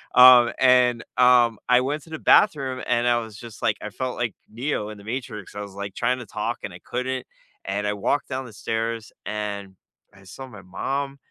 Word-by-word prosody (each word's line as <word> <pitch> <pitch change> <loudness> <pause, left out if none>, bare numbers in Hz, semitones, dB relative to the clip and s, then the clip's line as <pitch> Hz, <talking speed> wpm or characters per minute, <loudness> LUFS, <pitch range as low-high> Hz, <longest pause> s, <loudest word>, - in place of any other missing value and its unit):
Um, 125 -1 +9
and, 125 -2 +4
um, 125 -3 +5
I 125 0 +5
went 145 +3 -2
to 165 - -17
the 160 - -5
bathroom, 135 -10 +3
and 120 0 +2
I 120 0 +4
was 110 -3 -8
just 115 -2 -11
like - - +1
I - - -5
felt 130 -1 -4
like 120 -3 -2
Neo 115 -2 -3
in 105 - -9
The - - -13
Matrix. 115 -4 -6
I 105 - -4
was, 100 -2 -8
like, 100 -1 -6
trying 125 +2 0
to 120 - -8
talk, - - -3
and - - -5
I - - -11
couldn't. 130 +1 -4 0.4
And 100 +2 -2
I 105 - 0
walked 120 +9 -1
down 130 0 -3
the 115 - -12
stairs, 115 +1 -3
and 100 -2 -4 0.4
I 100 -1 -18
saw 130 +8 -10
my 105 -6 -12
mom. 135 +9 -3
120 Hz, 210 wpm, -24 LUFS, 105-130 Hz, 0.4 s, Um